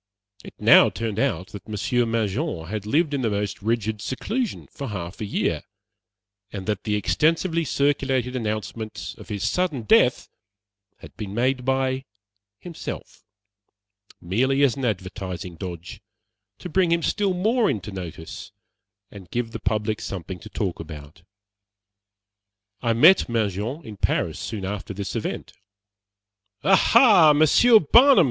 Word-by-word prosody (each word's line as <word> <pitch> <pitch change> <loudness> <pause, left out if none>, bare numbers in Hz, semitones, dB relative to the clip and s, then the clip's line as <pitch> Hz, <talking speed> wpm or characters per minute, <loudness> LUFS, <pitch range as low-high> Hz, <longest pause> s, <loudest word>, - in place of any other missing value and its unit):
It - - -12
now - - +7
turned 110 -2 -4
out 95 -9 -1
that 100 - -10
Monsieur 120 +3 0
Mangin 115 - -2
had 105 +3 -5
lived 150 +5 +1
in 140 - -1
the 115 - +1
most 100 -1 -3
rigid 110 -1 -1
seclusion 220 - -3
for 140 - -6
half 90 -2 -6
a - - -2
year, 100 - -1 0.9
and 95 -2 -6
that 105 -3 -3
the 105 -1 0
extensively 165 - +1
circulated 135 -3 0
announcements 110 -1 -4
of - - -12
his 105 0 -2
sudden 155 -4 -1
death 110 - +3 0.7
had - - -13
been 105 -2 -6
made 125 +2 0
by 130 0 0 0.5
himself, 170 - -8 1.0
merely 130 +10 +1
as 135 -4 +3
an 135 -2 -3
"advertising 95 -4 -4
dodge" 90 +3 -8 0.6
to - - -8
bring 180 0 +1
him 170 -1 +2
still 195 +1 0
more 220 +5 +2
into 105 0 -3
notice, 85 -4 -8 0.6
and 95 -4 -12
give 120 +1 -3
the 115 - -6
public 105 +1 -1
something 90 -1 -6
to 110 - -11
talk 100 -5 -3
about. 75 -1 -10 1.6
I 115 -2 +1
met 155 +7 +6
Mangin 115 - -2
in 105 -2 -9
Paris - - -1
soon 100 -4 -5
after 100 0 -5
this 100 0 -5
event. - - -4 1.1
"Aha, 195 - +6
Monsieur 155 - +6
Barnum!" 250 - +6
115 Hz, 140 wpm, -24 LUFS, 100-145 Hz, 1.6 s, now